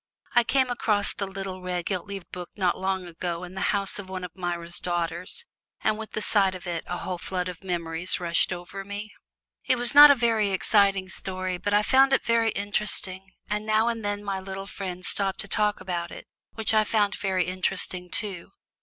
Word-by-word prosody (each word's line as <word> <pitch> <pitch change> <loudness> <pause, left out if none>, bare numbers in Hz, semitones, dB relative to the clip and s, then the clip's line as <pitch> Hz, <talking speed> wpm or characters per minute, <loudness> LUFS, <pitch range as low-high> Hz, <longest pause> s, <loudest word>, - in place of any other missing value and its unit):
I 240 - +5
came 260 +1 +2
across 210 -4 +2
the 200 -3 -4
little 190 -1 -6
red 180 -1 -3
gilt 185 -2 -2
leaved 195 -3 -7
book 180 -1 -7
not 185 -4 +1
long 190 -1 -2
ago 175 0 -4
in 180 0 -8
the 190 - -5
house 200 0 0
of 190 -2 -8
one 185 -1 -5
of 180 - -7
Myra's 175 -2 -2
daughters, 175 - -2 0.4
and 215 - +2
with 220 0 -8
the 215 - -2
sight 195 -3 +2
of 185 - -9
it 170 -2 -3
a 175 - -3
whole 180 -1 -4
flood 180 0 -3
of 180 0 -8
memories 170 -1 +1
rushed 170 0 +2
over 185 +2 -6
me. 205 +2 -7 0.5
It 255 - +5
was 240 0 0
not 290 +1 +11
a 285 - +7
very 225 -4 +2
exciting 195 0 +3
story, 185 -1 -4
but 205 +2 0
I 210 - +4
found 270 +4 +5
it - - +2
very 230 -1 +3
interesting, 195 -2 -1
and 210 0 -2
now 220 +1 +2
and 230 -2 -3
then 205 0 -2
my 195 -2 -2
little 195 0 -6
friend 185 -2 -6
stopped 195 -1 +1
to - - -6
talk 210 -1 +1
about 170 -2 -3
it, - - -10 0.3
which 220 -1 0
I 215 0 +5
found 210 -2 +1
very 190 -3 0
interesting 185 0 -2
too. 195 -3 -2
195 Hz, 205 wpm, -26 LUFS, 180-210 Hz, 0.5 s, not